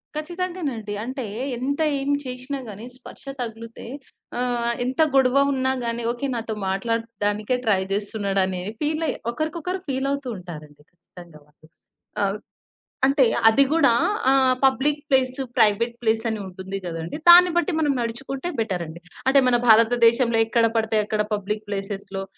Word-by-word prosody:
ఖచ్చితంగానండి. 310 - -4
అంటే 255 +1 -5 0.3
ఎంత 280 +5 -2 0.2
ఏమి 285 +1 0
చేసినా 255 +2 -5
గాని 210 +3 -9
స్పర్శ 255 - -13 0.2
తగిలితే 230 -1 -7 0.5
ఆహ్, 240 -1 0
ఎంత 260 +5 0
గొడవ 265 0 +4 0.2
ఉన్నా 260 0 0
గాని 235 0 -3
ఓకే 245 +3 -3
నాతో 225 -1 -3 0.2
మాట్లాడడానికే 215 +2 -1
ట్రై 195 -3 +3
చేస్తున్నాడనేవి, 195 -2 -1
ఫీలయి 310 +1 0 0.2
ఒకరికొకరు 325 +6 -3
ఫీలవుతూ 275 +1 -2
ఉంటారండి. 155 -5 -11
ఖచ్చితంగా 175 -2 -16
వాళ్ళు. 155 +1 -23 0.5
ఆహ్, 200 +1 0 0.7
అంటే 275 0 +4 0.2
అది 275 +5 +5
గూడా 300 -7 +4 0.4
ఆహ్, 265 -1 +4
పబ్లిక్ 275 +3 +2
ప్లేసు, 260 -1 +1
ప్రైవేట్ 220 +3 +3
ప్లేసు 225 0 +1
అని 220 -2 -3
ఉంటుంది 190 +1 -6
గదండీ! 165 - -5
దాన్ని 355 +1 +9
బట్టి 360 +2 0
మనం 295 -2 +2
నడుచుకుంటే 265 +7 -4
బెటరండి. 175 -6 -4 0.3
అంటే 275 +1 +6
మన 245 - +4
భారతదేశంలో 230 +1 +5
ఎక్కడ 230 0 +2
పడితే 220 -1 +1
అక్కడ 215 0 0
పబ్లిక్ 210 +1 -4
ప్లేసేస్‌లో 195 -1 -5
235 Hz, 130 wpm, -23 LUFS, 205-270 Hz, 0.7 s, దాన్ని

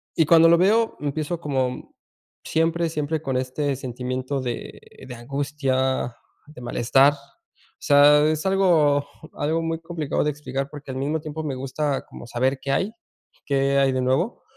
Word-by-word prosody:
Y 165 - +3
cuando 165 +1 +6
lo 170 - +6
veo, 220 +5 +2
empiezo, 150 +3 -3
como 130 -5 -3 0.5
siempre, 165 +1 0
siempre 155 0 -2
con 135 -4 -2
este 135 +2 -2
sentimiento 130 +1 -4
de 120 -2 -5 0.3
de 125 - -7
angustia, 130 -1 -1 0.3
de 150 -4 -13
malestar. 135 +4 +3
O 145 - -19
sea, 145 +1 +6
es 155 +3 -2
algo 165 -7 +3 0.3
algo 160 +3 -1
muy 165 0 -2
complicado 165 -4 -2
de 150 - +1
explicar 135 -1 -5
porque 145 -2 -8
al 130 - -5
mismo 145 +4 -1
tiempo 155 +1 -6
me 140 -3 -3
gusta 135 +2 -2
como 120 - -11
saber 130 +3 0
qué 135 - -3
hay 190 +9 0 0.5
qué 140 0 +1
hay 135 -1 +3
de 130 - 0
nuevo 135 - 0
145 Hz, 160 wpm, -23 LUFS, 130-160 Hz, 0.5 s, cuando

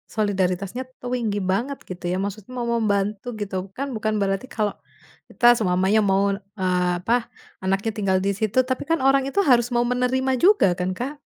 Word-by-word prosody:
solidaritasnya 200 +2 -1 0.2
tinggi 240 -5 -2
banget, 260 +8 -1
gitu 180 -1 -8
ya. 180 - 0
Maksud 200 0 -5
mau 245 - -2
membantu 210 -2 0
gitu, 200 -2 -4 0.2
kan 275 +1 -2
bukan 215 0 -1
berarti 195 +5 -1
kalau 210 -5 -1 0.6
kita 240 - -2
selamanya 190 +2 +2
mau, 195 +1 +2
eee, 185 -3 -1
apa, 235 +4 +1 0.4
anaknya 195 +4 0
tinggal 190 -2 +2
di 200 - +1
situ 220 +3 +2
tapi 260 - -1
kan 330 -2 +2
orang 270 0 +4
itu 400 - -1
harus 240 -4 +4
mau 240 - +3
menerima 250 +2 0
juga 405 - +6
kan, 180 +1 -1
Kak? 280 +4 -5
215 Hz, 170 wpm, -23 LUFS, 195-250 Hz, 0.6 s, juga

